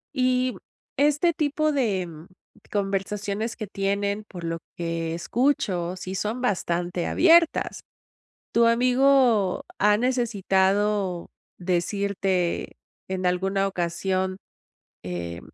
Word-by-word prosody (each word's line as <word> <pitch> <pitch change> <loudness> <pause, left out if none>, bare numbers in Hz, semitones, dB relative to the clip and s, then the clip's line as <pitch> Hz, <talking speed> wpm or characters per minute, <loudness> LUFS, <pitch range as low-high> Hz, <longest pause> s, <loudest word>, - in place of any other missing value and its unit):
Y, 255 -1 +1 0.4
este 295 +4 +3
tipo 305 0 0
de, 230 -10 +1
em, 165 -1 -10 0.4
conversaciones 205 +2 -2
que 215 - -5
tienen 200 +1 -1
por 175 -4 -10
lo 165 0 -3 0.2
que 165 -1 -2
escucho, 185 -4 0
sí 185 0 -6
son 210 +5 -2
bastante 175 -6 -1
abiertas. 335 -1 +4 0.7
Tu 235 0 +4
amigo 245 -4 +3
ha 210 +1 +4
necesitado 205 -5 +1 0.3
decirte 185 0 -1 0.3
en 185 0 -3
alguna 195 +2 +1
ocasión, 185 +1 -1 0.7
eh: 85 -1 -5
195 Hz, 95 wpm, -25 LUFS, 180-240 Hz, 0.7 s, abiertas